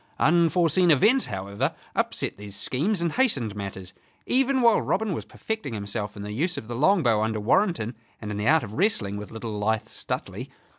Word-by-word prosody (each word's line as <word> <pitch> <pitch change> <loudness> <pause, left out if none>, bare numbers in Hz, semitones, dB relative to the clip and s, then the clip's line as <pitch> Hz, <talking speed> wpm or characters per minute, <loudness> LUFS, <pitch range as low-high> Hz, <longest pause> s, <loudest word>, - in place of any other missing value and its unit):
Unforeseen 170 +1 +3
events, 215 - +4
however, 100 0 -3 0.2
upset - - -1
these 100 -1 -9
schemes 170 - -1
and 170 - 0
hastened 135 - +1
matters, 95 -2 -6 0.3
even 265 +1 +2
while 230 -2 +5
Robin 210 0 0
was - - -5
perfecting 220 - -5
himself 105 0 -4
in 100 - -6
the 105 - -5
use 170 +10 -1
of 110 - -6
the 120 - -5
longbow 135 - +3
under 110 0 -1
Warrenton 120 - +1 0.2
and 105 -1 -6
in 105 - -4
the 105 +2 -1
art 160 +1 +4
of 105 -2 -7
wrestling 135 - +1
with 105 0 -7
little 110 -2 -5
lithe 110 +1 0
Stuteley. - - -5
120 Hz, 185 wpm, -25 LUFS, -, 0.3 s, while